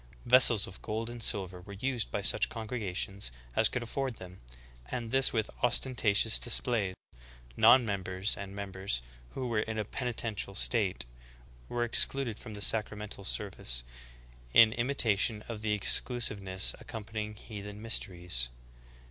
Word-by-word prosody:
Vessels 120 -4 +5
of 95 - -12
gold 115 +2 -4
and 120 -1 -9
silver 95 -4 +3
were 100 +2 -11
used 120 +2 -2
by - - -3
such - - +6
congregations 100 - -4 0.2
as - - +3
could 125 - -3
afford 130 +1 -4
them, 90 -2 -12 0.5
and 115 -3 -5
this 135 0 +4
with 110 -2 -2
ostentatious 115 -3 +3
display. 115 -5 0 0.6
Non 120 +3 +6
members 95 -1 -2
and 100 -1 -8
members 95 -10 -4 0.3
"who 130 -1 -3
were 115 -3 0
in 110 +1 -3
a 105 - -2
penitential 110 -4 -3
state" 95 - 0 0.6
were 120 0 -1
excluded 120 0 +1
from 110 -3 -10
the 105 - -9
sacramental 105 -2 0
service - - -2 0.4
— - - -24
in 110 -1 +5
imitation 115 -4 +3
of 115 -3 -6
the 110 -1 -1
exclusive 105 +1 +1
ness 95 0 +1
accompanying 110 -1 -7
heathen 105 -1 -9
mysteries. 90 - +1
105 Hz, 140 wpm, -30 LUFS, 95-120 Hz, 0.6 s, such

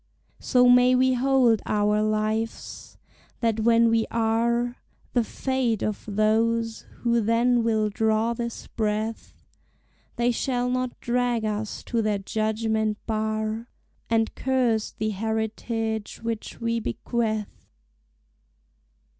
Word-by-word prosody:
So 250 -1 +4
may 250 +1 +6
we 260 +1 +3
hold 255 -3 +3
our 210 0 +2
lives, 215 +1 -2 0.4
that 225 -2 0
when 230 +1 +4
we 225 -1 +2
are 235 +2 +1 0.4
The 240 - +3
fate 250 -2 -1
of 215 - -2
those 225 +2 +1 0.2
who 235 -1 +2
then 235 +2 +2
will 220 -2 +2
draw 220 +2 +1
this 235 0 -5
breath, 220 0 -3 0.8
They 240 0 +2
shall 250 0 -1
not 255 -1 -2
drag 240 -2 0
us 210 0 -3
to 230 -2 -1
their 215 -2 +1
judgment 220 +1 -1
bar, 220 +1 -2 0.4
And 225 -1 +1
curse 250 -5 +1
the 215 0 -3
heritage 220 +1 -3
which 230 -1 -4
we 230 0 0
bequeath. 215 - -3
225 Hz, 115 wpm, -25 LUFS, 215-240 Hz, 0.8 s, may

